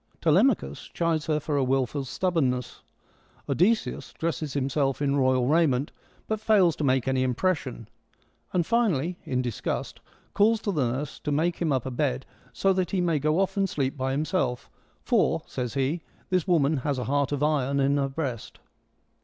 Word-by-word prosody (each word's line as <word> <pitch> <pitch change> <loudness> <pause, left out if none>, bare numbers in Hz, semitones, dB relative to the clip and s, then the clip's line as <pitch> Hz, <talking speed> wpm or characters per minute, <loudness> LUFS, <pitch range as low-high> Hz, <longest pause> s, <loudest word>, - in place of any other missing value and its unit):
Telemachus 70 +1 +2
eludes 165 -2 +1
her 155 -1 +1
for 150 0 -4
her 135 - +2
wilful 135 +1 0
stubbornness: 135 -4 -1 0.7
Odysseus 215 +7 +1
dresses 155 -3 -3
himself 135 0 0
in 140 -1 +1
royal 130 -2 +2
raiment, 145 -3 +2 0.4
but 220 -1 -1
fails 195 -7 +4
to - - -2
make 130 -3 +2
any 130 -1 +1
impression, 130 - -1 0.6
and 175 -3 +1
finally, 180 - +1
in 125 -1 -1
disgust, 120 -3 -3 0.3
calls 220 +2 +3
to 205 - -1
the 140 -9 +1
nurse 140 +4 -4
to 150 - -3
make 165 +4 +1
him 165 -3 0
up 130 -3 0
a 130 - -3
bed 65 - -1 0.3
so 195 0 +2
that 185 -2 0
he 195 - -1
may 170 -4 +1
go 155 +4 +1
off 195 +1 0
and 195 -1 +1
sleep 135 -4 -1
by 130 -1 -2
himself, 140 -3 -1 0.3
for, - - +2
says 125 0 -4
he, 140 +5 0 0.3
this 185 0 +1
woman 155 -4 +3
has 140 +1 -1
a 125 - -2
heart 140 +1 0
of 145 0 -1
iron 140 -2 +1
in 140 +1 +2
her 135 -1 0
breast. 135 -5 -5
145 Hz, 175 wpm, -26 LUFS, 130-170 Hz, 0.7 s, fails